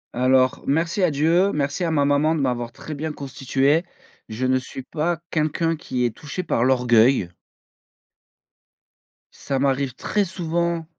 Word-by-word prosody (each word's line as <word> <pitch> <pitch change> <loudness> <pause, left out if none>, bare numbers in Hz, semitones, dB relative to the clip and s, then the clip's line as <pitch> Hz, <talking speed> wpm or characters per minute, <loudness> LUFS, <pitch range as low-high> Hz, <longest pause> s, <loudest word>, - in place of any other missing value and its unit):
Alors 130 +1 +3
merci 165 +7 0
à 180 - +4
Dieu, 165 +7 +2
merci 140 +3 -1
à 170 - 0
ma 145 -3 +2
maman 145 +3 +2
de 155 - -2
m'avoir 120 -3 -1
très 155 +6 -8
bien 155 +2 -4
constitué. 135 +2 0 0.5
Je 115 +4 -3
ne 130 0 +2
suis 130 +1 -9
pas 165 +5 -2
quelqu'un 165 +1 0
qui 125 -5 -2
est 120 - 0
touché 155 +5 -6
par 115 - 0
l'orgueil. 125 -5 +3 2.0
Ça 135 -1 -4
m'arrive 135 -2 0
très 205 +8 0
souvent 170 -1 -2
145 Hz, 145 wpm, -22 LUFS, 130-165 Hz, 2.0 s, à